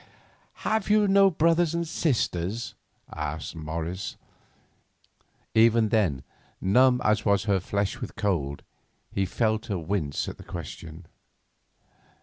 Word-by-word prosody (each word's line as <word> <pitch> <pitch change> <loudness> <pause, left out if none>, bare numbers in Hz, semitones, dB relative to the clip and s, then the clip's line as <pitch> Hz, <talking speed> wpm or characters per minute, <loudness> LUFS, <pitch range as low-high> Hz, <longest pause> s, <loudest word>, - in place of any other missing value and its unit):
"Have 220 -2 0
you 210 0 +4
no 195 0 +6
brothers 165 0 +2
or 170 0 0
sisters?" 115 - -1 0.4
asked 75 +1 -4
Morris. 80 +4 -4 1.4
Even 115 0 +5
then, 90 - +1 0.4
numb 125 +6 +4
as 105 0 +2
was 100 -2 +2
her 100 -2 +2
flesh 100 +2 -2
with - - -6
cold, 75 -9 -1 0.5
he 95 -1 0
felt 110 +1 0
her 100 -4 -1
wince 80 -4 -2
at - - -6
the - - -11
question. 80 0 -8
100 Hz, 120 wpm, -26 LUFS, 85-125 Hz, 1.4 s, no